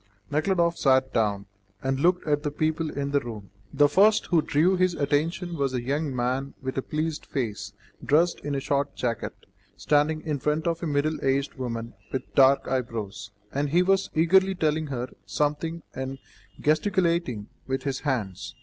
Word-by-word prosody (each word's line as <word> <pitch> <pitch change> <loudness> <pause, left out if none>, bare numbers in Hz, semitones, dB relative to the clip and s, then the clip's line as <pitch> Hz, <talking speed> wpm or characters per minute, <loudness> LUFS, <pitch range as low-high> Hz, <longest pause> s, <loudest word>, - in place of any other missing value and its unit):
Nekhludoff 170 +2 +1
sat 130 -1 +3
down, 100 -3 +1 0.4
and 135 0 0
looked 180 +4 +2
at 145 -1 +2
the 150 - -1
people 155 +2 -1
in 140 -1 -3
the 140 - +3
room. 110 -7 -8 0.2
The 145 +1 +5
first 205 +8 +4
who 170 -3 +3
drew 160 +5 +2
his 185 -1 +2
attention 165 +5 0
was 135 -4 -1
a 120 - -2
young 140 +1 -1
man 130 +3 -1
with 130 -1 -4
a - - -1
pleasant 155 +2 -3
face, 115 -7 -3 0.3
dressed 165 +4 +3
in 145 -1 -3
a - - 0
short 140 +1 -1
jacket, 115 -3 -2 0.4
standing 150 +1 +2
in 150 -3 -2
front 150 +3 0
of 170 -1 0
a 170 - -2
middle 150 +1 0
aged 135 +1 +1
woman 115 -3 -5 0.2
with 130 - -4
dark 135 0 +5
eyebrows, 115 -4 -3 0.2
and 145 +1 0
he 175 +5 +4
was 195 +1 +2
eagerly 190 +4 +4
telling 155 -2 0
her 125 -3 -3 0.2
something 150 +8 -1
and 130 +1 -4 0.4
gesticulating 170 - +1 0.2
with 130 0 -2
his 135 -2 -2
hands. 115 - -3
145 Hz, 170 wpm, -26 LUFS, 130-160 Hz, 0.4 s, The